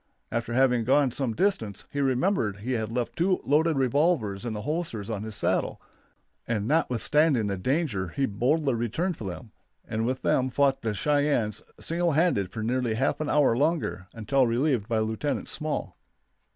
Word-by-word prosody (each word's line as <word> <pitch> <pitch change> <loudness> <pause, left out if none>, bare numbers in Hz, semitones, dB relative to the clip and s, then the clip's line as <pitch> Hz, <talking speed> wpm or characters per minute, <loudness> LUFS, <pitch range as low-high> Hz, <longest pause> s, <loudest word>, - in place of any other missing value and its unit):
After 115 +1 -2
having 125 -2 +3
gone 135 +2 +3
some 120 -3 -2
distance 115 - -1
he 145 - -1
remembered 130 - +1
he 125 +5 -3
had 110 -3 -1
left 120 0 -2
two 185 +2 +2
loaded 155 +2 +2
revolvers 130 - +1
in 115 - -2
the 105 -1 -5
holsters 145 - -3
on 105 -3 -3
his 110 -1 -4
saddle, - - 0 0.7
and 110 -3 -1
notwithstanding 150 -2 +2
the 100 -1 -1
danger 120 - -1
he 135 +11 -1
boldly 135 +7 +1
returned 120 - -1
for 110 - -8
them, 95 +4 -7 0.4
and 110 +1 -2
with 130 +3 -2
them 130 0 +2
fought 135 0 +2
the 110 -2 -2
Cheyennes 145 -6 +1 0.2
single 170 0 0
handed 150 - +2
for 110 +1 -5
nearly 120 -1 0
half 130 - 0
an 155 -1 -2
hour 145 -6 +4
longer, 145 - 0
until 125 +4 +1
relieved 120 -2 +1
by 115 -2 0
Lieutenant 110 +6 -1
Small. 155 -1 -3
125 Hz, 170 wpm, -27 LUFS, 110-150 Hz, 0.7 s, hour